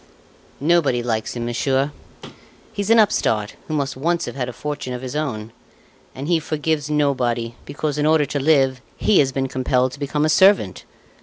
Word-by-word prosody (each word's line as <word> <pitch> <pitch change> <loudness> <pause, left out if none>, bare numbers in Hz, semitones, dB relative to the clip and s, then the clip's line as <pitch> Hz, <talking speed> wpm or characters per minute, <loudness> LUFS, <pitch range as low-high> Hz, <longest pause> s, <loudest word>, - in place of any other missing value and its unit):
"Nobody 145 -6 +2
likes 110 -1 -2
him, 120 -1 -3
monsieur. 135 +4 0 0.8
He's 200 0 -3
an 230 - +6
upstart 110 - +2
who 155 - -2
must 140 -2 -1
once 170 +5 0
have - - -7
had 125 -2 -3
a - - -4
fortune 145 0 -5
of 125 +1 -6
his 130 +2 -5
own; 115 -8 -3 0.6
and 135 +2 -5
he 170 -1 +3
forgives 155 -1 -2
nobody 125 -6 0
because, 145 +1 -3
in 150 - +2
order 155 -1 +4
to 145 - -3
live, 135 -3 +3 0.2
he 210 - +3
has 135 -2 +3
been 135 0 -1
compelled 130 0 0
to 140 - -11
become 150 +1 0
a - - +1
servant. 190 - +4
140 Hz, 180 wpm, -21 LUFS, 125-155 Hz, 0.8 s, an